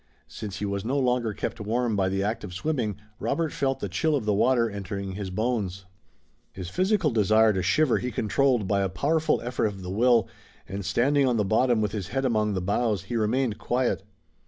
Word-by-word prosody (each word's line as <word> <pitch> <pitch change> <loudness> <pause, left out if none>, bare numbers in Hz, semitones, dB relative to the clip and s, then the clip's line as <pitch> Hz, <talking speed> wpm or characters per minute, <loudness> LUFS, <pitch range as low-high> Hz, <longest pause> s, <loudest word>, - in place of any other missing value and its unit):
Since 105 -4 -7
he 105 - -3
was 100 -1 -2
no 130 +5 -1
longer 125 -4 +1
kept 105 - -4
warm 115 +2 0
by 95 -2 +1
the 95 +1 -1
act 110 +3 -2
of 90 -4 -7
swimming 120 -3 -1 0.2
Robert 155 +8 -1
felt 135 -1 -1
the - - -2
chill 150 - 0
of 135 - -2
the 105 - +2
water 120 +3 +3
entering 100 -1 -5
his 95 0 -5
bones. 95 -3 -2 0.7
His 90 -2 -6
physical 185 - +2
desire 110 0 +4
to 95 - -1
shiver 125 +10 +2
he 125 - -3
controlled 120 0 +1
by 100 0 +1
a 95 - 0
powerful 155 - +1
effort 120 -2 0
of 100 -2 -6
the 90 - -5
will, 120 +3 +3 0.4
and, 100 +2 -5
standing 135 +7 +2
on 120 -2 +2
the 105 - +1
bottom 115 +2 +2
with 105 -2 0
his 100 -4 -4
head 135 +6 -2
among 110 -4 +1
the 95 - -1
boughs, 100 0 0
he 110 +5 -5
remained 115 +1 0
quiet. 125 -3 0
110 Hz, 205 wpm, -26 LUFS, 100-125 Hz, 0.7 s, desire